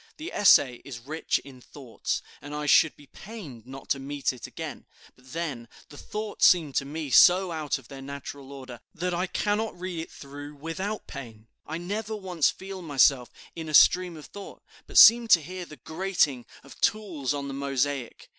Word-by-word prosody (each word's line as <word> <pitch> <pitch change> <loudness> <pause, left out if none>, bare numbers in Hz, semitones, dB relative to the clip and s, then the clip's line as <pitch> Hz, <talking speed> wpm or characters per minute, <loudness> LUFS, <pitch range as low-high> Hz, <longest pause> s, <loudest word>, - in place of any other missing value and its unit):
The 320 +4 -7
essay 135 -11 +5
is 120 -4 -9
rich 155 +3 -1
in 130 -2 -13
thoughts, 130 -3 -5 0.2
and 145 +1 -8
I 150 0 -3
should 150 +1 +5
be 145 - -16
pained 145 - -11
not 135 +1 -10
to 140 - +1
meet 140 0 -2
it 125 - -9
again. - - -8 0.3
But 130 0 -19
then, 145 -8 -4 0.2
the 145 - -13
thoughts 215 0 +1
seem 160 -6 +3
to 140 - 0
me 150 0 -5
so 180 +5 +6
out 155 -3 -2
of 135 -4 -16
their 135 -1 -10
natural 140 0 -8
order, 130 -3 -9 0.2
that 180 +2 -2
I 180 +2 -1
cannot 210 +1 -1
read 180 -2 -5
it 160 - -6
through 145 +1 -10
without 185 +8 -5
pain. 115 -6 -10 0.2
I 160 - -4
never 210 +5 -4
once 185 -6 +1
feel 190 0 -8
myself 135 -5 +3 0.3
in 160 -2 -6
a 155 - +1
stream 180 0 +5
of 150 - -11
thought, 200 -1 -11 0.2
but - - -3
seem 235 0 +9
to 180 - +7
hear 180 +3 -7
the 150 - -13
grating 160 -7 -1 0.2
of 140 - -15
tools 175 - 0
on 140 -1 -4
the 135 - -5
mosaic. 140 -2 -2
150 Hz, 190 wpm, -27 LUFS, 135-185 Hz, 0.3 s, seem